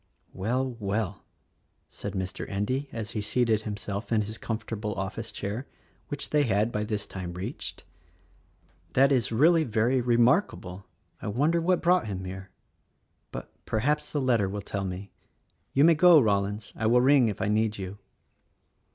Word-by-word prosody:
"Well! 125 +5 -1
Well!" 100 -1 -2 0.6
said - - -6
Mr. 95 -1 -4
Endy 130 +8 -1
as 110 -3 -5
he 105 - -2
seated 110 0 +1
himself 105 0 -5
in 110 -2 +3
his 110 +2 -7
comfortable 110 -2 -4
office 110 +4 -4
chair, 110 +7 -4 0.4
which 145 -1 -4
they 150 - +4
'had 110 -3 +2
by 105 -1 -1
this 105 -1 -2
time 90 -3 -6
reached. 95 - -5 1.1
"That 135 +2 +5
is 120 -6 +2
really 160 +8 +5
very 120 +1 +1
remarkable. 120 - +1 0.3
I - - -5
wonder 150 +11 +2
what 180 +1 +1
brought 180 -5 +3
him 95 -2 -4
here. 95 +1 -7 0.8
But - - -7 0.2
perhaps 145 +8 0
the 150 - 0
letter 115 -7 +2
will 100 +1 -4
tell 100 -1 -3
me. 95 +2 -6 0.6
You 140 - +4
may 165 +1 +7
go, 170 +1 +7
Rollins, 105 -2 0
I 110 - 0
will 120 +2 +5
ring 135 -1 +5
if 105 - -3
I - - 0
need 110 +1 +1
you." 95 +1 -6
110 Hz, 160 wpm, -27 LUFS, 100-130 Hz, 1.1 s, may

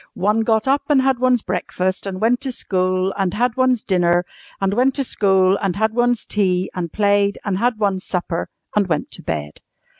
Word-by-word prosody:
One 210 +4 +1
got 220 +1 +1
up, 275 +2 +3
and 290 -2 +4
had 265 -2 +1
one's 250 -2 +2
breakfast, 185 +1 -2
and 185 -1 -4
went 235 +4 +2
to 270 - -3
school, 185 -3 -1
and 190 -2 0
had 240 +1 0
one's 255 -3 +2
dinner, 175 -2 +2 0.3
and 195 0 0
went 255 +4 +2
to 275 - 0
school, 190 -5 +2
and 190 -3 -1
had 220 +1 0
one's 245 -1 +1
tea, 185 -3 0
and 170 -3 -4
played, 200 -1 +2
and 195 -2 -1
had 240 0 +1
one's 195 -3 0
supper, 175 -2 -3 0.3
and 205 -2 +2
went 170 - -2
to - - -5
bed. 75 -2 -5
200 Hz, 200 wpm, -20 LUFS, 185-240 Hz, 0.3 s, and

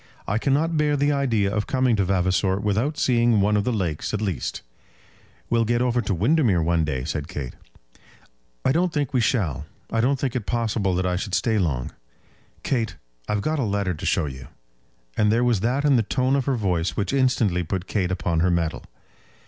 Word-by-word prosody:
"I 105 +3 0
cannot 155 +6 +1
bear 150 -1 +2
the 145 +1 +2
idea 115 -8 +1
of 105 -1 -1
coming 130 -3 +2
to 100 - +2
Vavasor 95 +1 +1
without 110 +9 0
seeing 120 -3 +3
one 105 +2 +2
of 105 - +1
the 125 - +1
lakes 90 -4 -2
at - - -2
least." 95 - -3 0.8
"We'll 115 -1 +2
get 120 +1 +1
over 125 -1 +1
to 100 - -1
Windermere 110 - +2
one 85 0 +2
day," 65 -5 -2
said 75 +1 -3
Kate. 70 -8 -6 1.1
"I - - +4
don't 175 +4 +1
think 145 -3 -2
we 125 - +3
shall. 90 - 0 0.2
I 115 - +1
don't 135 +4 +2
think 130 -2 -2
it 120 -5 -3
possible 110 -5 0
that 90 +1 0
I 90 -1 0
should 95 +1 -2
stay 110 -3 +1
long. 70 -9 -1 0.7
Kate, 115 -5 -1 0.3
I've 105 -1 0
got 155 +6 -1
a - - +1
letter 100 -3 -1
to 80 - -7
show - - +1
you." 65 -2 -8 0.7
And 105 0 +3
there 115 +2 +2
was 120 -5 +2
that 125 +8 0
in 140 -3 +5
the - - +3
tone 130 +5 0
of 135 -3 0
her 135 - +1
voice 90 -7 -1
which 105 +5 -1
instantly 125 -9 +2
put 90 +2 -3
Kate 95 -4 -1
upon 85 -3 -1
her 90 +3 +3
mettle. 85 -2 -1
105 Hz, 205 wpm, -24 LUFS, 90-125 Hz, 1.1 s, in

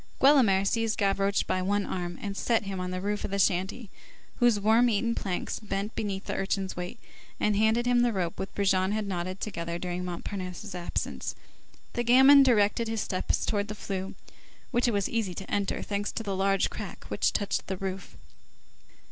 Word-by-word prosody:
Guelemer 240 -9 +5
seized 225 +2 0
Gavroche 195 0 +2
by 185 - -1
one 200 +2 0
arm, 175 -1 -4 0.2
set 225 +3 +1
him 195 -2 -4
on 180 0 -3
the 185 0 -3
roof 205 +1 -2
of - - -3
the 200 - -2
shanty, 190 +3 0 0.5
whose 240 -4 +4
worm 225 +4 +4
eaten 230 +2 +1
planks 190 -5 -3
bent 205 0 -3
beneath 200 -3 -3
the - - -3
urchin's 195 0 -2
weight, 180 +4 -5 0.4
and 210 -1 +2
handed 220 +3 +3
him 245 0 +3
the 240 0 +3
rope 180 -5 -2
which 190 - -3
Brujon 190 -1 +2
had 215 -1 -1
knotted 185 0 -3
together 170 -5 -4
during 180 0 -4
Montparnasse's 180 +2 -5
absence. 175 -1 -4 0.6
The 240 - -1
gamin 265 +4 +8
directed 230 -3 +3
his 225 -1 -1
steps 185 - -1
towards 205 -1 0
the 210 - -4
flue, 195 -2 -5 0.6
which 240 +1 +2
it - - +3
was 200 -3 0
easy 215 -6 -2
to 195 - -7
enter, 200 -1 -1
thanks 205 0 -2
to 225 - -5
a 195 - 0
large 195 0 +1
crack - - -7
which - - +1
touched 205 - -1
the 190 - -3
roof. 190 0 -5
200 Hz, 185 wpm, -28 LUFS, 190-220 Hz, 0.6 s, gamin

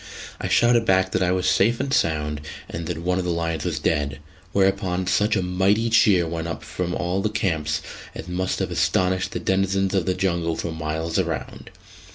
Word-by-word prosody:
I - - -3
shouted 120 -1 +4
back 95 -3 +2
that - - 0
I 90 -1 +2
was 90 0 0
safe 115 +4 +3
and 135 0 -2
sound, 75 -2 0 0.3
and 85 -1 -5
that 85 -2 -3
one 90 +1 +1
of - - -1
the 90 - -2
lions 85 -2 -1
was - - -1
dead: 70 -2 0 0.3
whereupon 95 -1 +1
such 105 +4 +2
a 95 - +1
mighty 95 +5 +1
cheer 100 -6 +5
went 80 0 -3
up 80 - -5
from 90 0 -3
all 90 +3 -1
the 105 - 0
camps 80 -7 -1 0.3
as 80 - -7
must 90 +1 -1
have - - -2
astonished 95 0 +1
the - - -3
denizens 95 0 +1
of 95 -2 0
the 90 - +1
jungle 85 -3 0
for 85 - -4
miles 80 +2 -2
around. 80 -8 -4
90 Hz, 200 wpm, -23 LUFS, 85-95 Hz, 0.3 s, cheer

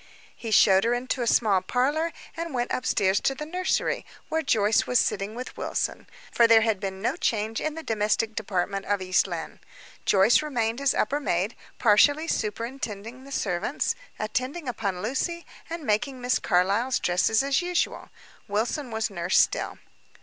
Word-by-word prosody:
He 230 - -7
showed 195 -2 +5
her 235 +1 +2
into 255 +1 -2
a 235 - -1
small 205 -5 +3
parlor, 285 - 0 0.2
and 335 -4 -4
went 245 0 -1
upstairs 200 -6 +1
to 270 - 0
the 300 - -6
nursery, 365 +4 -1 0.3
where 320 0 0
Joyce 215 -6 +2
was 250 - +2
sitting 205 0 0
with 250 +1 -7
Wilson - - -3 0.2
for 235 - +5
there 225 -1 +7
had 220 -3 +1
been 190 0 -5
no - - +1
change 220 0 -1
in 310 0 -2
the 325 - -7
domestic 220 -2 0
department 195 -2 -2
of 205 0 +1
East 185 +1 +2
Lynne. 170 -3 -6 0.5
Joyce 200 +7 +5
remained 240 -5 -1
as 280 - +2
upper 285 +2 +1
maid, 195 -5 -1 0.2
partially 285 +9 +4
superintending 230 0 -4
the 275 - -12
servants, 210 - -1 0.2
attending 255 +8 -3
upon 200 -6 -3
Lucy, 335 +9 -2 0.2
and 335 -1 -5
making 255 +3 0
Miss 250 +1 +1
Carlyle's 200 +7 +2
dresses 180 +7 +2
as 275 +3 +1
usual. 355 0 -1 0.4
Wilson 235 +7 -1
was 220 -1 -2
nurse 175 -1 0
still. - - +2
230 Hz, 165 wpm, -26 LUFS, 205-270 Hz, 0.5 s, there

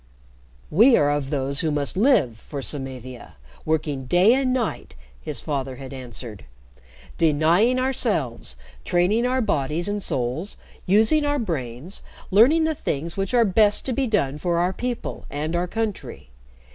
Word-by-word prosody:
"We 230 - +6
are 145 0 +3
of 145 -2 -2
those 140 -1 -1
who 160 - +1
must 145 +1 -2
live 190 - +3
for 140 +2 -7
Samavia 130 - -6 0.3
working 150 -4 -1
day 180 - +5
and 260 -1 +1
night," 250 -4 -3 0.3
his - - -4
father 135 -3 -3
had 135 0 -9
answered; 120 - -8 0.7
"denying 165 +10 +3
ourselves, 205 - -1 0.3
training 200 +8 +2
our 260 +1 +1
bodies 160 - 0
and 205 0 -2
souls, 130 - -2 0.3
using 220 +11 +4
our 290 0 +1
brains, 155 - -4 0.3
learning 255 - +5
the 315 0 +1
things 165 - -3
which 195 +5 -2
are 235 -1 +5
best 205 +1 +3
to 260 - -1
be 270 +1 0
done 150 - 0
for 170 +1 0
our 180 +2 +1
people 245 +3 -5
and 155 +4 -3
our 175 +1 0
country. 215 - -5
170 Hz, 150 wpm, -23 LUFS, 135-225 Hz, 0.7 s, We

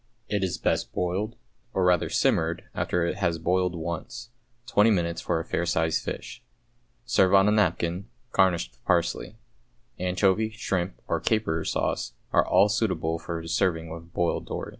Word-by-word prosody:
It 105 -2 -1
is 95 - -1
best - - -1
boiled, 95 +6 -1 0.4
or 95 - +2
rather 90 -2 +3
simmered, 80 +1 +1
after 90 -1 0
it - - -2
has 85 -1 0
boiled 90 +2 +1
once, 85 +7 -5 0.3
twenty 115 -3 +4
minutes 85 -5 0
for 85 -2 0
a 80 - -5
fair 85 - -1
sized 80 -2 +1
fish. - - -6 0.6
Serve 95 -4 +4
on 95 +1 +6
a - - +4
napkin, 95 -2 +1 0.2
garnished 90 -10 +2
with - - -32
parsley. 85 +4 0 0.6
Anchovy, 95 +4 +2
shrimp, 95 -4 -3
or - - 0
caper 95 -8 0
sauce, - - -1 0.2
are - - +5
all 95 +3 +5
suitable 85 -7 0
for 85 0 -5
serving 85 -2 0
with 85 +1 -9
boiled 85 0 -1
dory. - - -4
90 Hz, 160 wpm, -26 LUFS, 85-100 Hz, 0.6 s, on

